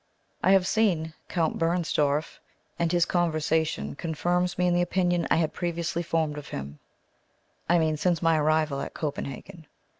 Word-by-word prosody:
I - - +2
have 190 -2 +4
seen 185 -7 +1 0.2
Count 165 -3 0
Bernstorff; 160 -3 0 0.4
and 170 -1 +1
his 175 -1 +3
conversation 160 - 0
confirms 175 - -1
me 180 - +2
in 175 - +3
the 175 - +3
opinion 175 -1 +1
I - - +4
had 160 -1 0
previously 170 -1 -2
formed 160 -3 -1
of 145 - -11
him; 70 +1 -7 0.9
I 175 - +5
mean, 160 -2 +1
since 175 +1 +1
my 165 0 +3
arrival 155 -2 +1
at - - -6
Copenhagen. 155 +3 -6
165 Hz, 155 wpm, -27 LUFS, 155-175 Hz, 0.9 s, I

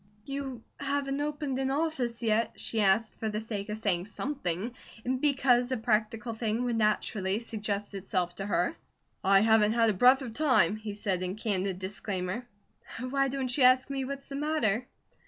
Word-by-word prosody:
"You 270 -4 -5 0.2
haven't 275 0 -1
opened 290 -3 -2
an 265 0 0
office 270 -6 -1
yet?" 225 +1 +1
she 225 - 0
asked 205 +3 +3
for 220 - -1
the 210 0 -2
sake 215 -2 -5
of 210 - -3
saying 195 -4 0
something, 220 - -3 0.3
and 255 +1 -1
because 265 -4 +3
a 260 - +1
practical 225 +1 0
thing 225 +1 -1
would 240 -2 0
naturally 210 -2 +1
suggest 210 -3 -3
itself 185 -2 -2
to 195 - -3
her. 180 -3 +1 0.5
"I 195 +1 +5
haven't 220 -1 +4
had 230 -1 +4
a - - -2
breath 255 +7 +5
of 235 -4 -6
time," 255 - +3
he 215 -1 -6
said 195 -3 -1
in 185 +1 -2
candid 195 -4 -1
disclaimer. 190 +3 -4 0.5
"Why 275 +2 +1
don't 260 -2 -2
you 275 - +3
ask 255 +2 +5
me 270 -1 -1
what's 275 +1 -5
the 275 - -6
matter?" 255 -6 0
225 Hz, 175 wpm, -29 LUFS, 205-265 Hz, 0.5 s, I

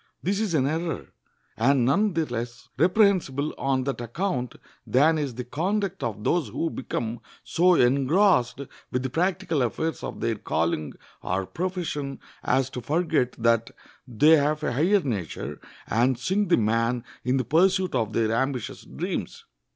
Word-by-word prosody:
This 195 +2 0
is 210 -6 0
an 135 -3 +3
error, 160 +1 -2 0.5
and 125 +2 +3
none 200 - +2
the 165 -1 +1
less 120 -1 -6
reprehensible 175 - +2
on 135 -1 +1
that 135 -2 -3
account 125 - -2 0.3
than 155 +5 +4
is 140 -5 -3
the 125 - -4
conduct 190 - -2
of 110 -3 -3
those 170 -1 +1
who 145 +9 -2
become 115 -2 -4 0.2
so 180 +1 +3
engrossed 135 - +3 0.3
with 125 0 -1
the 130 - -3
practical 175 -2 0
affairs 160 +7 -2
of - - -5
their 115 -2 -1
calling 80 -5 -1 0.3
or 95 +1 -1
profession 160 - -3 0.2
as 130 +1 +1
to 125 - -5
forget 155 -1 0
that 115 0 +1 0.4
they 150 +7 +5
have 150 +2 0
a - - 0
higher 180 - +3
nature, 105 - -4 0.3
and 120 +2 +2
sink 190 +10 0
the 175 - +5
man 115 +2 +1 0.2
in 125 +1 +1
the 130 - -1
pursuit 185 - +3
of 110 -4 0
their 110 0 +1
ambitious 130 +1 -2
dreams. - - -5
135 Hz, 155 wpm, -25 LUFS, 120-170 Hz, 0.5 s, they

